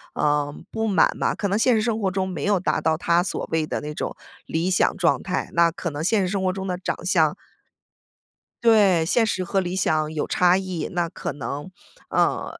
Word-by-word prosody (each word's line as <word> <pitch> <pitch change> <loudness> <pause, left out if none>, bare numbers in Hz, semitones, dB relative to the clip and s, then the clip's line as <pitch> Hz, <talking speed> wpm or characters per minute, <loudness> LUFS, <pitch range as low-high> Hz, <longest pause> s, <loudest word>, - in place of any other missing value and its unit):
呃， 145 -1 +1 0.2
不 225 0 -2
满 200 -3 +4
吧。 - - 0
可 205 - -2
能 200 +2 0
现 250 +2 +3
实 215 - +2
生 220 -1 0
活 195 -3 0
中 190 0 -1
没 180 - -5
有 200 -2 +2
达 - - 0
到 160 -1 +1
他 170 +1 +2
所 190 - -4
谓 160 -1 +1
的 - - -3
那 150 0 -6
种 - - -4 0.3
理 165 +3 -1
想 185 - +2
状 175 -2 +1
态， 185 -1 -2
那 170 0 +4
可 170 +1 -4
能 145 +2 -4
现 205 +2 +2
实 185 - 0
生 190 0 -2
活 185 - +2
中 190 0 -5
的 180 -1 -2
长 180 -1 -4
相 160 -3 +3 1.3
对， 200 -7 +5
现 235 +3 +3
实 185 -4 -1
和 195 +2 0
理 180 0 -2
想 155 -4 0
有 150 - -2
差 180 0 +4
异。 185 -4 -3
那 175 -2 -1
可 - - -5
能 145 +4 -6 0.4
呃， - - 0
180 Hz, 235 characters per minute, -23 LUFS, 160-195 Hz, 1.3 s, 对